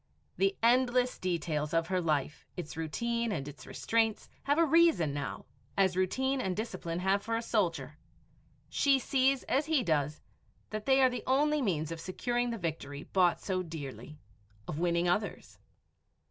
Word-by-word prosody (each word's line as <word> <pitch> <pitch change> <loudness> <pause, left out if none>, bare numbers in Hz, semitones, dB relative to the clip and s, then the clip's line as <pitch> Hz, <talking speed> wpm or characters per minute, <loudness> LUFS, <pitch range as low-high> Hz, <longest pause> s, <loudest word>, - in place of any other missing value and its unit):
The 390 0 +2
endless 250 +1 +3
details 160 -4 -1
of 165 0 +2
her 185 -1 +1
life, 150 -3 -1
its 170 -3 -6
routine 235 +9 -1
and 145 -7 -3
its 145 0 -10
restraints, 225 -2 0 0.2
have 285 +2 +2
a 335 - +5
reason 320 - +4
now, 145 -1 -4 0.3
as 190 -2 +3
routine 260 +9 0
and 185 -6 -2
discipline 185 -6 -4
have 190 +2 +1
for 225 +2 -2
a 230 - 0
soldier. 165 - -1 0.7
She 275 -1 +3
sees 265 +1 +2
as 290 +3 0
he 310 -5 +2
does 150 -3 0 0.5
that 215 0 -5
they 270 0 +5
are 260 - +6
the 245 - -4
only 295 +3 +3
means 165 - -1
of 165 -1 -5
securing 240 +7 -1
the 230 - -3
victory 150 -5 -4
bought 180 -2 +2
so 185 -2 -1
dearly 155 -3 -8 0.5
of 150 - -4
winning 170 0 +1
others. 200 +4 -2
190 Hz, 160 wpm, -31 LUFS, 165-250 Hz, 0.7 s, are